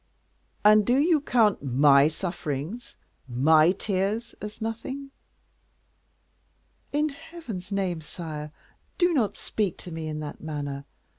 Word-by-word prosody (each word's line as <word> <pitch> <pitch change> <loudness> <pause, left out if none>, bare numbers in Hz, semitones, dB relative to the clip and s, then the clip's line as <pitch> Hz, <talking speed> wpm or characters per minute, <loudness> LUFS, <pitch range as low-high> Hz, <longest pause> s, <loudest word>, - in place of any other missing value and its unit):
"And 215 0 +7
do 245 +5 +3
you 310 +1 +4
count 225 -7 +3
my 140 +1 +5
sufferings, 165 - -4 0.3
my 155 +6 +5
tears, 200 +4 -1
as 210 0 -7
nothing?" 260 +5 -5 1.8
"In 300 +2 +1
Heaven's 280 - -8
name, 185 -4 -1
sire, 150 -2 -7 0.5
do 350 -1 +3
not 235 -9 +1
speak 205 -6 -2
to 175 - -9
me 160 -1 -5
in 155 0 -4
that 150 -1 -7
manner. 145 -3 -4
190 Hz, 120 wpm, -26 LUFS, 150-235 Hz, 1.8 s, And